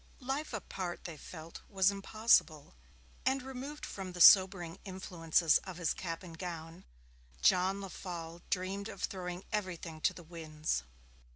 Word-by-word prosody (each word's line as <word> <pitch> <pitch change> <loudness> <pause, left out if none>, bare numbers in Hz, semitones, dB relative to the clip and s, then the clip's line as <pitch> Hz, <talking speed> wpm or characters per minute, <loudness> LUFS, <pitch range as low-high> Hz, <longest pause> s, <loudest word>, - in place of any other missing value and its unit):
Life 275 +3 -3
apart, 190 -4 -4
they 170 - -6
felt, 160 +2 -10
was 195 -1 +4
impossible, 195 - +2 0.5
and, 265 0 +1
removed 265 +3 -6
from 190 -2 -6
the 180 - -7
sobering 180 -2 +7
influences 175 -4 +2
of 185 -3 -8
his 170 -3 +1
cap 165 -2 -5
and 165 -2 -10
gown, 165 -2 -6 0.6
John 190 - +4
Lefolle 175 -3 -7
dreamed 195 +2 -2
of - - -8
throwing 180 -1 -4
everything 175 -6 -3
to - - +3
the 175 - -10
winds. 155 - -3
180 Hz, 135 wpm, -33 LUFS, 165-195 Hz, 0.6 s, sobering